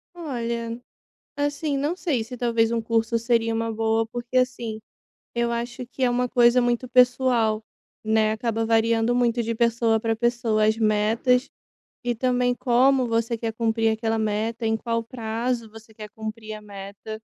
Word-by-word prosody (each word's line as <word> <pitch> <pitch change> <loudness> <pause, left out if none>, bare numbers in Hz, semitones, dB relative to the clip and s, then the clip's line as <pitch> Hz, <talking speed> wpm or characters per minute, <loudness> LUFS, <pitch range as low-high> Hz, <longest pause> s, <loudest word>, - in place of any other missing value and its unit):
Olha, 235 -6 -4 0.6
assim, 290 0 -1
não 295 +6 -1
sei 285 - -1
se 250 +2 -8
talvez, 230 -1 +1
um 230 - +1
curso 230 +1 0
seria 230 -1 +1
uma 225 0 -1
boa, 225 0 +1
porque, 240 +2 -5
assim, 240 -4 -1 0.5
eu 235 0 0
acho, 240 +1 -4
que 260 +1 -8
é 250 - +4
uma 250 0 0
coisa 240 0 +5
muito 240 +1 0
pessoal, 245 -3 +3 0.4
né, 220 0 +2
acaba 225 0 -1
variando 225 +1 +2
muito 240 -1 +2
de 230 +1 -2
pessoa 230 -1 +2
pra 225 0 0
pessoa. 235 -2 +1
As 220 +1 +3
metas, 225 +4 +2 0.6
e 240 -1 0
também, 245 +1 +1
como 255 +1 +3
você 230 0 0
quer 225 -1 -3
cumprir 225 0 +1
aquela 225 0 -1
meta, 220 +2 -1
em 220 0 +2
qual 230 0 -2
prazo 230 -1 -3
você 225 0 -15
quer 215 -1 -9
cumprir 220 0 -7
a 215 - -8
meta. 200 +2 -9
230 Hz, 165 wpm, -24 LUFS, 225-245 Hz, 0.6 s, coisa